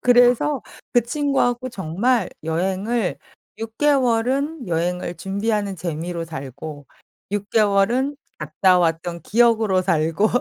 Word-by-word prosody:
그래서 245 +3 +4 0.3
그 240 - +5
친구하고 255 -1 0
정말 200 +3 0
여행을 190 +6 -1 0.4
6 225 0 -7
개월은 270 - +1
여행을 175 +1 -1
준비하는 200 0 -2
재미로 170 0 -4
살고 145 0 -8 0.4
6 205 0 -3
개월은 225 +6 +2 0.2
갔다 180 +5 +3
왔던 170 0 -1
기억으로 225 -3 +3
살고 165 +2 +1
200 Hz, 235 characters per minute, -22 LUFS, 170-240 Hz, 0.4 s, 그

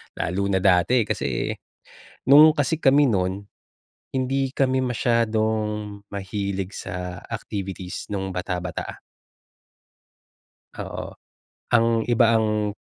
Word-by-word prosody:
Lalo 95 +4 -2
na 95 -1 +1
dati, 100 +6 +4
kasi - - -2 0.8
nung 150 +3 +9
kasi 150 0 0
kami 140 +1 +5
nun, 95 -2 0 0.7
hindi 135 +1 0
kami 130 -1 +2
masyadong 110 -4 0
mahilig 100 -1 -3
sa 90 -1 -6
activities 95 -3 -5
nung 95 -1 -3
bata-bata. 90 -1 -4 1.8
Oo, - - -6 0.6
ang 115 -1 +2
iba 120 -1 +4
ang 105 -2 +1
105 Hz, 95 wpm, -24 LUFS, 95-120 Hz, 1.8 s, nung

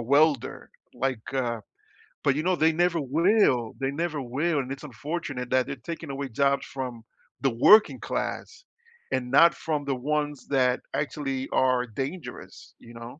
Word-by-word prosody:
welder, 140 +2 +2 0.2
like, 125 -2 -2
uh 120 -4 -1 0.6
but 140 - +3
you 155 - -1
know, 185 +1 +2
they 160 -1 +3
never 170 +1 +1
will, 145 - +2
they 135 0 0
never 155 0 -2
will 145 +6 0
and 130 -1 -4
it's 135 +1 -6
unfortunate 145 -1 -5
that 130 0 +3
they're 140 -3 -7
taking 160 -3 -6
away 135 0 -4
jobs 140 +3 +1
from 125 -4 -6 0.4
the 135 - +3
working 210 - +6
class 455 +2 -4 0.5
and 125 -1 -1
not 170 +5 +7
from 150 -3 -2
the 140 -2 0
ones 145 +1 -2
that 130 -2 +2 0.2
actually 135 -3 -2
are 130 -1 +3
dangerous, 135 - -7
you 120 - -14
know? 115 +4 -9
140 Hz, 160 wpm, -26 LUFS, 125-155 Hz, 0.6 s, not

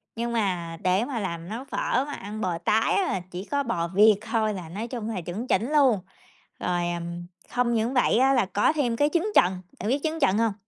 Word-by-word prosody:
nhưng 235 +1 -2
mà 180 -7 -1
để 185 +5 +2
mà 250 -3 -3
làm 170 -4 -4
nấu 230 +4 -5
phở 260 -1 0
mà 290 - -5
ăn 210 +2 -6
bò 180 -4 -1
tái 210 +6 +2
á 400 - +3
là 190 - -1
chỉ 180 +2 -6
có 285 0 +1
bò 175 -9 -1
Việt 210 +4 +5
thôi 220 -1 0
là 180 -5 -7
nói 210 +7 -5
chung 230 -3 -5
là 205 -5 -3
chuẩn 185 +9 -5
chỉnh 245 +4 +1
luôn. 270 -8 +4 0.6
Rồi, 175 -1 -1
ừm, 170 0 -5 0.2
không 245 -1 +1
những 230 +2 0
vậy 245 -3 +3
á 265 +2 +4
là 245 -6 +3
có 205 +9 +2
thêm 260 -7 0
cái 290 +5 +2
trứng 360 +5 +1
chần, 180 0 +4 0.2
bạn 205 - -2
biết 270 +4 +2
trứng 320 0 -1
chần 195 -8 +3
hông? 225 -2 +2
220 Hz, 235 wpm, -26 LUFS, 185-245 Hz, 0.6 s, Việt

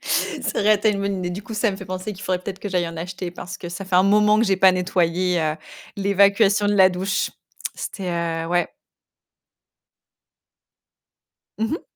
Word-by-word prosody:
Ça - - -1
aurait 215 +1 +5
été 215 +1 +2
une 200 -1 -2
bonne 200 -1 -1
idée. 180 -1 -3
Du 190 +4 -6
coup, 220 - -8
ça 215 +1 +1
me 190 - -5
fait 195 - -9
penser 185 +2 -5
qu'il 190 - -11
faudrait 185 -1 -1
peut-être 195 -1 -6
que 205 - -5
j'aille 180 -3 0
en 165 - -9
acheter 180 +2 -5
parce 180 +1 -8
que 175 - -7
ça 175 +3 -6
fait 185 -1 +1
un 185 - +6
moment 210 +2 +4
que 225 - +3
j'ai 195 -3 +2
pas 190 0 +6
nettoyé, 180 -1 +1
heu, 155 -1 -1 0.4
l'évacuation 200 +1 +3
de 205 - +2
la 190 -2 +7
douche. 185 +1 -1 0.4
C'était, 190 -2 -5 0.4
heu - - -5
ouais. 175 0 +1 2.9
Mmh 225 +1 -1
mh. 320 - -3
190 Hz, 195 wpm, -22 LUFS, 180-205 Hz, 2.9 s, la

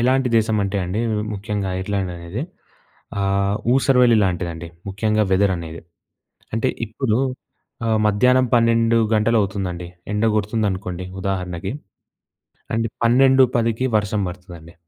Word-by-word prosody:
ఎలాంటి 130 +1 +2
దేశం 110 -1 +2
అంటే 100 +1 -2
అండి. 95 +5 -2 0.3
ముఖ్యంగా 100 -1 -3
ఐర్లాండ్ 95 -1 -2
అనేది 85 - -5 0.8
ఆహ్, 100 +1 +1 0.2
ఊసరవెల్లి 125 -2 +4
లాంటిదండి. 85 -2 -3 0.2
ముఖ్యంగా 105 +2 +1
వెదర్ 95 +1 +3
అనేది. 85 -1 -7 0.7
అంటే 115 +3 +1 0.2
ఇప్పుడు 110 +1 -1 0.7
ఆహ్, 110 -1 +2
మధ్యాహ్నం 125 +5 +3
12:00 115 0 +3 0.2
గంటలు 110 +1 +3
అవుతుందండి. 90 -3 -4 0.3
ఎండ 105 +2 +1
కొడుతుందనుకోండి 100 -4 -2 0.2
ఉదాహరణకి 95 0 -3 1.0
అంటే 115 0 0 0.2
12:10కి 125 -1 +3
వర్షం 105 0 -1
పడతాదండి. 85 -2 -11
105 Hz, 110 wpm, -21 LUFS, 95-115 Hz, 1.0 s, ఊసరవెల్లి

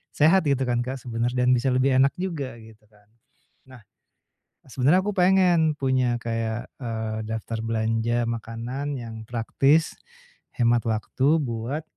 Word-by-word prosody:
sehat 165 +4 +4
gitu 135 -2 +1
kan 120 -1 +1
Kak, 130 - -4
sebenernya 120 +1 -2
dan 125 - +3
bisa 125 +1 +2
lebih 130 +2 +2
enak 135 +1 +4
juga 165 -9 -4
gitu 110 -1 -17
kan. 105 -1 -26 0.6
Nah, 130 -3 -14 0.9
sebenernya 135 +8 +3
aku 210 - -1
pengen 180 -4 +4
punya 130 -3 +1
kayak, 115 0 -3
eee, 110 -3 -4
daftar 110 +1 -4
belanja 115 +1 0
makanan 115 +5 -4
yang 115 -2 -8
praktis, 135 +7 +1 0.6
hemat 120 -2 +2
waktu 130 +7 +1
buat, 125 +4 -3
120 Hz, 135 wpm, -24 LUFS, 115-140 Hz, 0.9 s, sehat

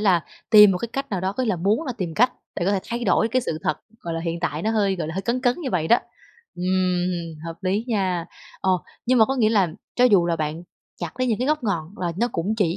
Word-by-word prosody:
là 185 -5 +3 0.3
tìm 210 -2 +9
một 180 - -1
cái 235 - -4
cách 275 0 -3
nào 190 -3 -1
đó, 190 +1 -1
có 255 - -2
nghĩa 230 - -2
là 185 - 0
muốn 205 - +1
là 255 - -2
tìm 170 -4 -3
cách 250 +2 +4 0.2
để 175 - -1
có 200 - +3
thể 195 - +1
thay 235 0 -4
đổi 220 +3 +3
cái 255 +1 +1
sự 160 -9 -3
thật, 155 - 0 0.2
gọi 170 -1 -4
là, 165 - -2
hiện 165 0 -3
tại 155 -1 -2
nó 220 - +1
hơi, 200 -3 +1
gọi 165 -3 -3
là, 160 - -5
hơi 195 - -2
cấn 235 +5 -1
cấn 245 -1 +2
như 270 -7 -3
vậy 160 -3 0
đó, 235 - +7 0.6
ừm, 180 -2 0
hợp 165 0 -6
lý 195 +4 0
nha. 185 -6 0 0.3
Ờ, 190 - +1 0.4
nhưng 255 +1 +4
mà 220 - +7
có 270 +4 -2
nghĩa 220 -4 +3
là 200 -5 +3 0.3
cho 250 - +5
dù 195 -8 +5
là 170 - +1
bạn 155 +1 -3 0.4
chặt - - -4
lấy 255 - +2
những 225 -2 +1
cái 255 - -1
gốc 305 -4 +1
ngọn 175 -3 -2
là 175 -2 -1
nó 240 - +2
cũng 190 +7 -1
chỉ 180 -4 +1
195 Hz, 280 wpm, -23 LUFS, 170-230 Hz, 0.6 s, tìm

